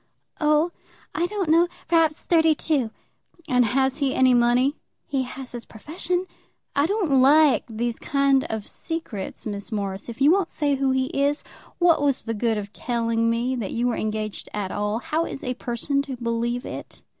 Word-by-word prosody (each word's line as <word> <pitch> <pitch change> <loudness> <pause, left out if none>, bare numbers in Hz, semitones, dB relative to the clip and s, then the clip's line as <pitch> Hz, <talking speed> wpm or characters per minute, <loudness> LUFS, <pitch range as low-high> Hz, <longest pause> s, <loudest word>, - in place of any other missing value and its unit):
"Oh, 305 +2 +3 0.4
I 345 - 0
don't 395 -2 -2
know; 335 +3 +5 0.2
perhaps 325 -2 +2
thirty 320 -2 +4
two." 285 -7 0 0.6
"And 250 -3 +4
has 265 +4 +1
he 275 -2 +1
any 260 -1 +5
money?" 245 +4 +3 0.3
"He 275 -2 -1
has 260 0 -7
his 240 -1 -6
profession." 345 - -3 0.5
"I 285 +2 +3
don't 350 -10 +2
like 295 +1 +5
these 230 +1 -3
kind 275 -1 +2
of 220 -2 -4
secrets, 320 - -5
Miss 205 +1 -5
Morris. 200 0 -3
If 235 - -8
you 285 +3 +6
won't 380 -1 +2
say 290 -2 0
who 270 0 +1
he 260 0 +2
is, 285 +1 0 0.3
what 345 -4 +4
was 280 -2 +1
the 225 - -3
good 225 0 0
of 205 0 -6
telling 230 -1 0
me 240 +3 0
that 215 -5 -4
you 235 +1 0
were 245 - +1
engaged 215 -1 -3
at 200 -3 -3
all? 210 +1 -1
How 315 +7 -1
is - - -7
a 250 - -1
person 250 +3 -1
to 275 -2 -6
believe 235 +1 -2
it?" - - -8
260 Hz, 180 wpm, -24 LUFS, 230-300 Hz, 0.6 s, you